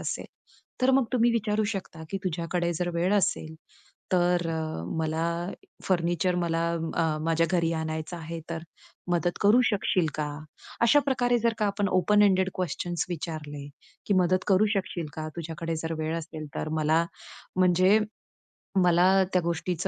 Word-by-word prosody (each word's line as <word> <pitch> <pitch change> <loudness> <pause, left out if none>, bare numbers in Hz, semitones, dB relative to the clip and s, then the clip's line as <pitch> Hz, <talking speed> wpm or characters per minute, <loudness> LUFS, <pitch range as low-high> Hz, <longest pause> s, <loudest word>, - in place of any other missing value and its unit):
असेल, - - -4 0.6
तर 260 - +5
मग 265 -1 +4
तुम्ही 240 -1 +4
विचारू 215 -1 +1
शकता, 160 -4 -6
की 195 - -1
तुझ्याकडे 170 0 -1
जर 175 +1 -1
वेळ 180 +4 +2
असेल, 160 -5 0 0.6
तर 175 -1 +3
अ, 160 - -3 0.2
मला 160 +1 0 0.6
फर्निचर 175 0 +1
मला 165 -1 0 0.4
अ, 155 -1 0
माझ्या 165 0 +2
घरी 170 -2 +2
आणायचं 160 +1 -3
आहे, 165 0 -6
तर 165 -1 -4 0.5
मदत 175 0 0
करू 215 +5 +6
शकशील 195 -5 +1
का? 150 -1 -1 0.6
अशा 235 +5 +6
प्रकारे 245 -2 +2
जर 230 0 +2
का 210 - +2
आपण 200 0 0
ओपन 205 +3 +4
एंडेड 190 -2 +3
क्वेशन्स 175 -1 -2
विचारले, 155 -4 -5 0.4
की 205 - +2
मदत 185 0 +2
करू 200 +2 +5
शकशील 185 -4 -2
का, 155 0 -4
तुझ्याकडे 165 0 -4
जर 160 +1 -3
वेळ 155 +1 -1
असेल 155 -1 -7
तर. - - -2
मला 155 +2 +3 0.5
म्हणजे 185 +3 +5 0.9
मला 175 +1 +5 0.3
त्या 180 - +4
गोष्टीच 170 +2 -2
175 Hz, 150 wpm, -27 LUFS, 160-190 Hz, 0.9 s, करू